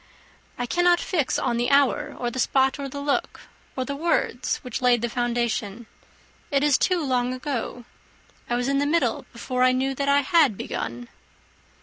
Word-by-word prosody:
"I 245 - -2
cannot 350 +6 +3
fix 310 -8 0
on 235 - 0
the 240 +1 0
hour, 285 +1 +2
or 240 -1 -2
the 260 - -5
spot, 265 +2 +2
or 275 -1 -4
the 280 - -6
look, 285 -1 -1 0.3
or 260 - -2
the 280 - -4
words, 315 -4 0
which 250 -2 -5
laid 245 -2 +3
the 240 - 0
foundation. 235 -2 -2 0.6
It 280 -1 +1
is 295 -2 +4
too 360 -3 +1
long 250 -1 0
ago. 250 -3 -4 0.6
I 240 - +1
was 245 +1 -1
in 275 0 +1
the 285 - +1
middle 335 +3 0
before 255 -1 -3
I 255 0 +5
knew 265 +1 0
that 280 +1 -1
I 285 0 +4
had 285 - +3
begun." 120 +1 -5
260 Hz, 185 wpm, -24 LUFS, 245-285 Hz, 0.6 s, I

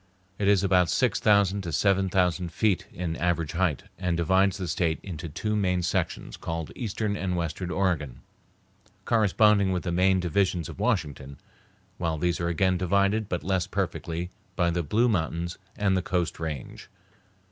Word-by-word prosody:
It 100 - +1
is 100 -1 +4
about 90 -3 +3
six - - +2
thousand 100 -1 +3
to 85 -3 -5
seven 95 +4 +2
thousand 90 -2 +1
feet 100 +2 +1
in 85 -2 -3
average 85 -3 0
height, 85 -5 0 0.2
and 90 -2 0
divides 95 +4 +3
the 95 -3 -4
State 80 0 0
into 85 -3 -6
two 105 +8 -2
main 90 -3 +1
sections 85 - -2
called 80 -1 -4
Eastern 105 -3 -2
and 95 -3 -2
Western 85 +2 -3
Oregon, 80 -10 -1 0.8
corresponding 105 -3 +4
with 90 -1 -1
the 85 - -2
main 95 +2 +3
divisions 90 -2 0
of - - -10
Washington; 75 - -1 0.6
while 80 -2 -1
these 85 +2 0
are 85 - -1
again 90 +1 +1
divided, 100 +3 +1
but 85 -4 -2
less 95 0 0
perfectly, 90 -3 -3 0.2
by 85 -1 +2
the 85 +1 0
Blue 105 +10 +2
Mountains 85 -4 -1 0.2
and 100 -2 +2
the 95 - +1
Coast 90 -4 -2
Range. 80 -5 -6
90 Hz, 165 wpm, -27 LUFS, 85-100 Hz, 0.8 s, is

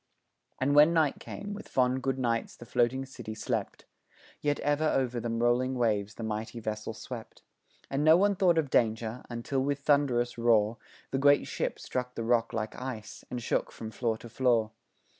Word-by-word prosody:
And 135 +2 +2
when 150 +3 +7
night 155 -4 +2
came, 205 0 -7
with 205 - -8
fond 130 0 +2
good 135 0 -1
nights 115 -3 -1
the 120 - -12
floating 120 +3 +1
city 110 -4 -8
slept, - - -3 0.6
Yet 145 0 0
ever 145 +2 +2
o'er 135 - +2
the 115 - -3
rolling 120 +3 +1
waves 105 -4 0
the 115 - -6
mighty 110 +2 -4
vessel 110 0 -4
swept, 115 +1 -9 0.4
And 135 +2 -1
no 160 +2 +7
one 200 +2 +3
thought 180 -3 +3
of 150 -5 0
danger 115 +1 +1
until 120 +3 -2
with 140 +1 -1
thunderous 130 -5 +2
roar, 115 -1 +3 0.3
The 135 - 0
great 145 +1 +5
ship - - -2
struck 125 0 -4
the 115 - -3
rock 115 0 +2
like 110 -1 -3
ice, 115 -5 -6
and 125 -2 -4
shook - - 0
from 110 -1 -7
floor 115 -1 -1
to 120 - -11
floor. 115 -3 +2
125 Hz, 180 wpm, -29 LUFS, 115-140 Hz, 0.6 s, when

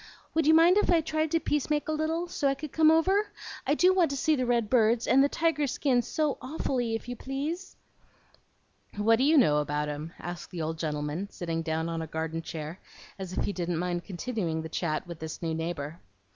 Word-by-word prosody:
Would 320 -2 +2
you 315 - +7
mind 340 +4 +6
if 420 - +2
I 345 -2 +5
tried 315 0 -1
to 330 - +2
peace 295 -2 -1
make 300 0 0
a - - 0
little, 320 +3 -1
so 295 -5 -1
I 275 - +2
could 300 0 -7
come 315 -1 +5
over? 380 +6 +3 0.4
I 290 - +3
do 365 +4 +5
want 355 -4 +3
to 280 - -3
see 315 +2 +2
the 255 -3 -1
red 235 -3 +2
birds 230 0 +3
and 265 +3 +5
the 285 - +3
tiger 320 -3 +1
skin 255 -1 +1 0.4
awfully, 255 -4 -1
if 225 - -6
you 245 - -4
please." 295 - -4 1.2
"What 225 +2 +4
do 255 - +1
you 305 +3 +5
know 150 - +5
about 150 0 -1
'em?" 150 +3 -6
asked 175 0 -7
the 175 - -5
old 160 +1 -3
gentleman, 150 +4 -3
sitting 165 -4 -3
down 160 0 -2
on 165 -1 -3
a 160 - -5
garden 160 +1 -3
chair, 160 +2 -6 0.4
as 185 -1 -6
if - - +1
he 205 - -1
didn't 175 -2 -2
mind 175 0 -2
continuing 180 -5 -3
the 160 - -6
chat 160 -1 -2
with 170 -2 -8
this 160 0 -6
new 165 -1 -1
neighbor. 160 -1 -4
230 Hz, 220 wpm, -28 LUFS, -, 1.2 s, you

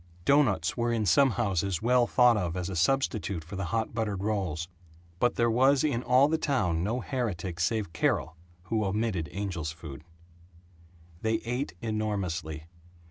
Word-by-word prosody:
Doughnuts 110 - +3
were 120 -1 0
in 115 -2 0
some 135 +10 +5
houses 100 -6 -1
well 125 0 +4
thought 125 -2 +5
of 90 -4 -2
as 90 0 -3
a 95 - -4
substitute 100 -4 0
for 90 +6 -9
the 95 0 -3
hot 115 +3 -2
buttered 105 -4 -2
rolls. 95 -7 -2 0.5
But 120 - +2
there 120 - +2
was 130 +3 +4
in 135 -6 0
all 130 +3 +4
the 160 +1 0
town 90 - 0
no 115 +6 -1
heretic 95 - -3
save 100 0 -1
Carol 85 0 0 0.3
who 110 +3 -1
omitted 100 -4 -1
angel's 85 -3 -4
food. 80 -3 -10 1.2
They 110 0 +1
ate 125 -1 -3
enormously. 100 -8 -3
105 Hz, 155 wpm, -28 LUFS, 85-120 Hz, 1.2 s, some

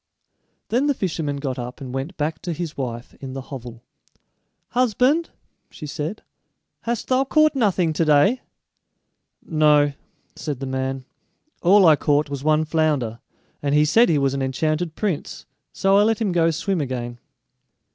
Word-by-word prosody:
Then 255 +5 +2
the 285 - +2
fisherman 160 -8 -2
got 135 -2 -3
up 125 +1 -6
and 130 -2 -7
went 135 +7 -4
back 155 +1 -2
to 175 - -3
his 160 -1 -5
wife 120 -3 -5
in 135 -1 -6
the 135 - -5
hovel. 120 -3 -8 0.9
"Husband," 255 +7 +2 0.4
she - - -9
said, 155 +7 -5 0.6
"hast 235 -1 -3
thou 260 +1 +3
caught 310 +3 +3
nothing 195 - +1
to 160 - +1
day?" 155 - +4 1.0
"No," 150 -2 +3 0.4
said 145 -5 -4
the 135 - -4
man; 130 0 -3 0.6
"all 195 +2 +6
I 160 -2 +7
caught 145 0 +1
was 140 -1 -4
one 155 +1 +3
flounder, 150 -8 0 0.4
and 145 0 0
he 150 0 +5
said 225 +10 +4
he 155 - +3
was 135 -1 +1
an 135 - -2
enchanted 155 +5 -1
prince, 195 -8 -3 0.3
so 195 0 +2
I - - +6
let 220 +1 +2
him 215 -4 0
go 165 -1 +3
swim 170 +2 -1
again." 120 -3 -4
155 Hz, 160 wpm, -22 LUFS, 135-195 Hz, 1.0 s, I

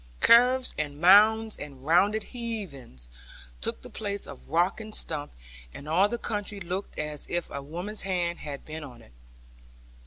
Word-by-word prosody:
Curves, 250 +2 +5
and 145 -1 -3
mounds, 215 +5 +6
and 135 -2 -9
rounded 200 +7 +3
heavings, 185 - -6 0.5
took - - -4
the - - -9
place 205 -2 -3
of - - -11
rock 175 +7 +1
and 215 -1 -6
stump; 150 -2 -2 0.4
and 140 - -9
all 185 +6 +3
the 240 - -2
country 205 -3 -3
looked 185 +2 -5
as 150 -1 -4
if 175 -1 -1
a 140 - -4
woman's 175 +9 -4
hand 175 -3 -1
had 145 -2 -7
been 155 0 -7
on 120 -5 -11
it. - - -19
175 Hz, 160 wpm, -27 LUFS, 150-210 Hz, 0.5 s, mounds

